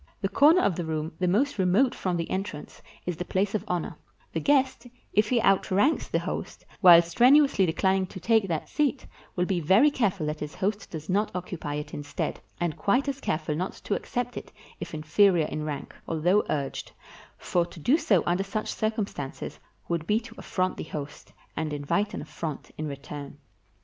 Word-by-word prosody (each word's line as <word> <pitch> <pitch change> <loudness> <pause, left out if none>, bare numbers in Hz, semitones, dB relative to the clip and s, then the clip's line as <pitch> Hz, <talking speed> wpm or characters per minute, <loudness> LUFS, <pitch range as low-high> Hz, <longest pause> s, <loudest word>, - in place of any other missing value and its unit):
The 195 - -1
corner 310 - +6
of 180 - +2
the 175 - -3
room 160 0 -3
the 180 - +1
most 215 +7 +1
remote 190 +8 +3
from 180 -2 -2
the 165 - -2
entrance 190 -6 -5 0.2
is 180 -2 -3
the 180 - -3
place 195 +2 0
of 215 - -1
honor; 175 -2 -2 0.4
the - - 0
guest, 265 -4 +2 0.3
if 210 0 +3
he 245 - +3
outranks 195 +7 +2
the - - 0
host, - - -5
while 175 -3 +9
strenuously 245 - +4
decUning 190 +1 +1
to 190 - -8
take 220 +2 +3
that 165 -4 -2
seat, 285 -2 0 0.3
will 180 - +1
be 185 -2 0
very 195 - +5
careful 200 - 0
that 150 0 -3
his 150 0 -6
host 200 +3 -2
does 155 -1 -7
not 205 +3 +1
occupy 170 -5 -4
it 150 0 -5
instead, 145 0 -4 0.2
and 170 -3 -1
quite 250 +8 +2
as 275 -1 -3
careful 155 -1 -1
not 180 +5 -2
to - - -4
accept 245 +3 -3
it - - -8 0.3
if - - -6
inferior 165 +2 +3
in 155 0 -4
rank, 150 -2 -5
although 175 +6 +2
urged, 140 -2 -3 0.4
for 175 - 0
to 175 - -12
do 245 - +3
so 195 - +3
under 175 +3 +1
such 215 +2 -3
circum 215 -1 0
stances 140 -8 -7 0.3
would 170 -2 -2
be 210 +1 +3
to 230 - -12
affront 185 0 -1
the - - -4
host, 145 -2 -7 0.2
and 155 -1 -2
invite 195 +9 -1
an - - -5
affront 155 -1 -6
in 155 - -4
return. 145 0 -7
185 Hz, 190 wpm, -27 LUFS, 155-215 Hz, 0.4 s, while